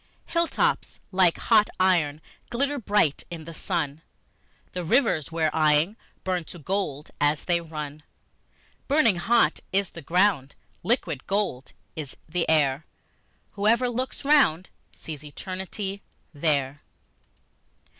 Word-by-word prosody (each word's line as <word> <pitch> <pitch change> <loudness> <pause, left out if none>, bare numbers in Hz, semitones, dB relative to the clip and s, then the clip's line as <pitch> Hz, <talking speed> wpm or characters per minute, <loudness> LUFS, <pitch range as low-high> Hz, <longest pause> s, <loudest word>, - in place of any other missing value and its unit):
Hill 335 0 +1
tops - - 0
like 185 -3 +4
hot 215 -2 +4
iron 165 -5 +2 0.3
glitter 280 +4 -1
bright 205 - +2
in 170 -2 -7
the 165 +1 -9
sun, 160 -4 -2
And - - -39
the 180 - -3
rivers 170 - +2
we're 160 -2 +1
eying 155 +5 +3 0.3
burn 180 -2 -1
to 175 - -9
gold 165 -4 -3
as 145 +1 +2
they 175 -1 +2
run; 150 -2 -6 0.9
Burning 275 - +4
hot 235 +6 +3
is 195 0 +1
the 170 - -9
ground, 170 -3 +2 0.3
liquid 165 - -1
gold 190 - -1 0.2
is 150 -4 -7
the 170 +1 -1
air; 150 -2 +2 0.6
Whoever 230 +5 +2
looks 255 +3 -4
round 235 - +4 0.2
sees 150 -3 -9
Eternity 190 +5 -5 0.3
there. 145 -2 0
170 Hz, 125 wpm, -26 LUFS, 150-205 Hz, 0.9 s, like